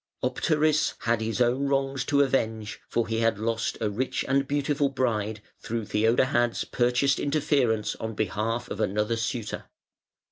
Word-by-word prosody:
Optaris 155 -1 +1
had 115 -1 +1
his 110 +2 -2
own 125 +3 +2
wrongs 135 -1 0
to 145 -1 +4
avenge, 110 -5 -1
for 115 - 0
he 115 0 -1
had 115 -2 +2
lost 115 +1 -1
a 110 - 0
rich 125 +6 -2
and 135 +1 +2
beautiful 145 0 +1
bride 110 -5 -1 0.2
through 115 -1 -3
Theodahad's 120 +3 +2
purchased 125 +3 +1
interference 140 -7 +1
on 110 -1 -5
behalf 110 +4 -1
of - - -4
another 105 +4 0
suitor. 115 0 -3
120 Hz, 145 wpm, -27 LUFS, 110-135 Hz, 0.2 s, to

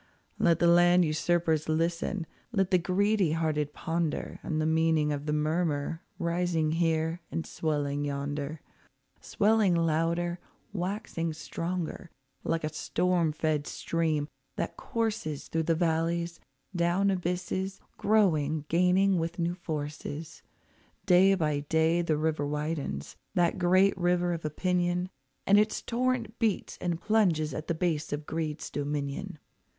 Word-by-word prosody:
Let 170 -4 +4
the 175 - +2
land 175 +1 +6
usurpers 160 0 +1
listen, 165 +3 0 0.3
let 195 -4 +1
the 185 - +5
greedy 190 0 +2
hearted 155 -2 0
ponder, 165 0 -2
On 155 - -2
the 155 - +1
meaning 160 -1 +2
of 145 +1 -4
the - - +1
murmur, 155 0 0 0.2
rising 170 -3 0
here 165 0 0
and 165 - -2
swelling 145 -2 -1
yonder, 145 +1 -3 0.6
Swelling 210 -3 +2
louder, 170 +2 +1 0.3
waxing 180 -3 -2
stronger, 170 +2 -4 0.3
like 165 -1 -1
a 155 0 -3
storm 175 0 +1
fed 155 -1 -1
stream 160 -3 -1 0.3
that - - -3
courses 220 -10 -3
Through 165 - 0
the 165 - +4
valleys, 170 0 0 0.4
down 175 +3 +2
abysses, 185 +1 -2 0.2
growing, 160 -8 +2
gaining 180 +2 +3
with 165 +1 -3
new 170 0 0
forces. 155 -1 -5 0.6
Day 190 +1 +6
by 150 -5 0
day 160 +3 +2
the 160 -3 0
river 155 -2 0
widens, 150 - -3 0.2
that 175 +1 +2
great 185 +2 +4
river 175 0 +2
of 165 - -5
opinion, 180 +3 0 0.4
And 200 +1 +6
its 215 +1 +1
torrent 240 -2 -1
beats 220 -3 -1
and 175 -2 -1
plunges 175 -7 +2
at 155 - -5
the 170 - 0
base 160 -2 -1
of 145 +1 -3
greed's 155 -1 -3
dominion. 145 +5 -3
165 Hz, 130 wpm, -29 LUFS, 155-180 Hz, 0.6 s, land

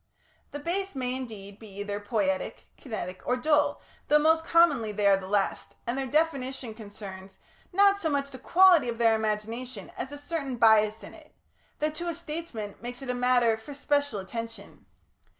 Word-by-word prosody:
The - - -6
Base 360 +4 -2
may, 255 -1 -1
indeed, 210 -6 -7
be 220 - -11
either 205 0 -3
poietic, 205 -3 -1
kinetic, 185 -8 -6
or 250 - +3
dull, 295 +3 +2 0.2
though 300 - +6
most 320 +2 +4
commonly 295 -10 +4
they 205 0 -1
are 200 -1 +7
the 190 -1 -6
last, 200 0 -1
and 235 - -1
their 270 0 -2
definition 270 -5 0
concerns 200 -3 -10 0.3
not 400 +1 +5
so 330 -5 -1
much 280 -1 -1
the 260 - -9
quality 345 -2 +5
of 230 - -3
their 230 -1 +4
imagination 220 +3 -3
as 265 - -5
a 290 - -6
certain 290 -3 -3
bias 220 -1 +4
in - - -10
it, - - -17 0.4
that 305 0 -1
to 345 +3 -3
a 335 - -3
statesman 305 -11 -6
makes 245 +2 -6
it 255 - -2
a - - -1
matter 245 -2 +3
for 250 +6 -10
special 285 -3 0
attention. 230 +1 -8
250 Hz, 180 wpm, -28 LUFS, 215-295 Hz, 0.4 s, are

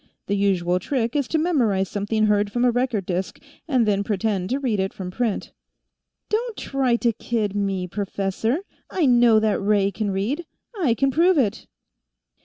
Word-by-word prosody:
The 200 - -1
usual 180 -3 +1
trick 235 +3 -2
is 285 -4 +1
to 320 - 0
memorize 240 - +1
something 210 +2 0
heard 205 -1 +2
from 245 +2 +1
a 245 - +4
record 245 -5 -1
disk, 185 +1 -3 0.3
and 255 -7 +2
then 200 -1 +2
pretend 200 -2 -1
to 260 - 0
read 240 -7 -1
it 190 0 -1
from 180 -2 -6
print." 230 0 -2 0.8
"Don't 455 +1 -2
try 265 -3 0
to 235 -1 +1
kid 215 -3 -2
me, 195 -2 -1
professor. 200 - -2 0.3
I 355 -5 +1
know 240 -3 +5
that 215 -2 +1
Ray 200 -1 +2
can 210 0 -2
read. 230 - -2 0.3
I 305 - +1
can 275 +3 +1
prove 340 +5 +3
it." 225 -8 0
220 Hz, 175 wpm, -23 LUFS, 195-255 Hz, 0.8 s, know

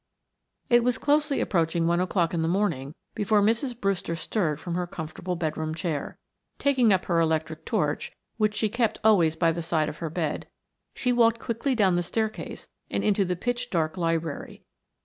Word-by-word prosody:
It 240 -2 +5
was 245 -1 +1
closely 295 0 +2
approaching 165 -2 +1
one 170 +1 +2
o'clock 180 -2 +1
in 165 - 0
the 160 - +1
morning 165 -7 -1 0.2
before 210 0 +2
Mrs. 230 +4 +1
Brewster 195 -5 -1
stirred 160 -2 -1
from 170 +1 -5
her 180 0 -1
comfortable 170 +2 -5
bedroom 155 -1 -2
chair. 160 -4 -3 0.4
Taking 260 -6 +3
up 190 -1 +2
her 170 -2 +2
electric 160 -1 0
torch, 155 -10 -1 0.3
which 215 -1 +1
she 220 - +1
kept 230 +1 0
always 175 -8 +4
by 165 0 +3
the 170 +1 -3
side 160 -2 0
of 155 - -8
her 165 - -4
bed, 160 -2 -2 0.5
she 250 -1 +1
walked 230 -1 +4
quickly 235 +3 -1
down 190 -6 +3
the - - +2
staircase 220 +5 -3 0.2
and - - -1
into 205 -1 +3
the 180 -1 -1
pitch 245 +5 -2
dark 160 -2 0
library. 165 -4 -2
180 Hz, 180 wpm, -26 LUFS, 165-220 Hz, 0.5 s, It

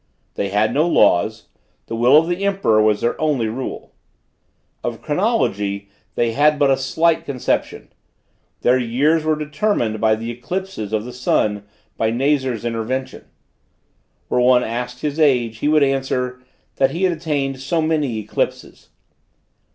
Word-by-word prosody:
They 100 - -2
had 105 +2 +1
no 155 +4 +2
laws; 110 - +2 0.4
the 115 - -5
will 125 +5 +5
of 160 +1 +4
the 175 +3 -2
emperor 195 - +2
was 105 -1 +2
their 120 - -1
only 145 -7 +1
rule. 125 +4 -6 0.9
Of 120 -2 -3
chronology 105 - -1 0.3
they 120 -1 +1
had 150 +5 +3
but 140 -1 +3
a - - +5
slight 160 +5 +1
conception; 130 -3 -3 0.7
their 125 +1 +3
years 140 +7 +1
were 155 0 +1
determined 150 - -1
by 110 -1 +3
the 115 +2 -5
eclipses 125 - -5
of 110 0 -1
the 125 - -8
sun 105 -4 0 0.3
by 110 - +1
Nazar's 130 -1 0
intervention. 120 +3 -3 1.0
Were 125 - +1
one 125 0 +4
asked 125 +2 -4
his 150 +1 -3
age, 120 -7 +2
he 145 - -1
would 155 -1 +4
answer: 130 -2 -1 0.4
that 135 - +3
he 175 +3 -3
had 185 -2 +3
attained 145 -5 -2
so 150 +5 -1
many 155 -7 0
eclipses. 110 0 -4
130 Hz, 150 wpm, -20 LUFS, 115-150 Hz, 1.0 s, will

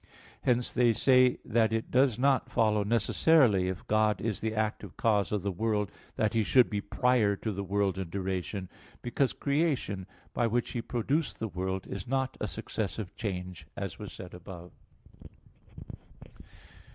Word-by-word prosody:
Hence 125 -1 +1
they 120 -2 +4
say 125 +1 +4
that 115 -1 +2
it 115 0 -2
does 130 -3 +3
not 135 0 +2
follow 110 -3 +2
necessarily 115 - +3
if 95 -1 -4
God 110 0 +2
is 110 -3 -2
the 110 0 -2
active 110 -3 -2
cause 105 -3 +2
of 105 -3 -1
the 100 - 0
world, 105 +1 -1 0.2
that 110 -1 +1
He 115 -1 +2
should 125 +4 +4
be 105 -1 -1
prior 110 -1 +2
to 110 +2 -3
the 100 0 -4
world 100 -1 0
in 95 -3 -4
duration; 95 +1 -3 0.4
because 125 +2 +1
creation, 140 - -1 0.3
by 120 - +1
which 120 +1 -1
He 120 - -2
produced 135 +7 -1
the 110 - -3
world, 95 +1 -3
is 95 -2 -6
not 130 0 -1
a - - 0
successive 100 -1 -4
change, 90 -5 -5
as - - -5
was - - -7
said 90 - -10
above 90 -1 -10 1.6
(Q. - - -18
110 Hz, 165 wpm, -30 LUFS, 95-120 Hz, 1.6 s, they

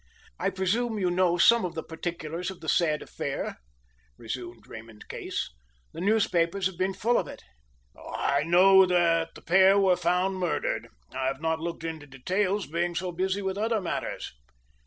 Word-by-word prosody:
"I - - +1
presume 215 +5 -1
you 185 -3 +1
know 175 -1 +2
some 230 +6 +5
of 180 - -4
the 160 - -4
particulars 165 +1 -5
of 190 - -8
the 160 - -10
sad 155 0 +2
affair," - - -4 0.6
resumed 120 0 -7
Raymond 110 -1 -12
Case. - - -4 0.4
"The - - -7
newspapers 190 -3 +1
have 190 -1 0
been 185 +2 -1
full 240 +2 +2
of - - -3
it." - - -10 0.5
"I 140 0 -1
know 185 +4 +6
that 165 -2 +2
the - - -13
pair 190 +2 +5
were 190 -2 +4
found 180 +2 0
murdered. 180 -2 -1 0.3
I 130 - -1
have 135 0 -2
not 160 0 -1
looked 170 0 -5
into 160 -3 -5
details, 185 +9 -1
being 170 +3 -2
so 180 +1 -2
busy 190 +3 -1
with 190 +1 -2
other 220 +1 +1
matters." 180 - -4
175 Hz, 170 wpm, -27 LUFS, 165-190 Hz, 0.6 s, know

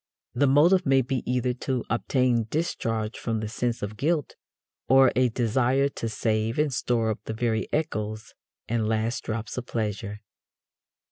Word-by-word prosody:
The 140 +3 +3
motive 170 +7 +5
may 135 -3 +3
be 130 0 -2
either 125 0 +1
to 125 0 -2
obtain 120 -1 +1
discharge 115 -8 -2
from 115 -2 -2
the 110 - -3
sense 120 +1 -2
of 105 +1 -5
guilt 150 +3 0 0.5
or 135 -1 +6
a 125 0 +3
desire 125 +4 +1
to 115 -4 -4
save 110 +1 -1
and 150 -2 +1
store 115 -2 +1
up 110 - -4
the 110 - -4
very 110 -1 -1
echoes 110 -8 -3 0.3
and 110 -1 0
last 110 +2 -1
drops 110 +1 -4
of 120 - -9
pleasure. 105 -1 -3
120 Hz, 155 wpm, -26 LUFS, 110-130 Hz, 0.5 s, or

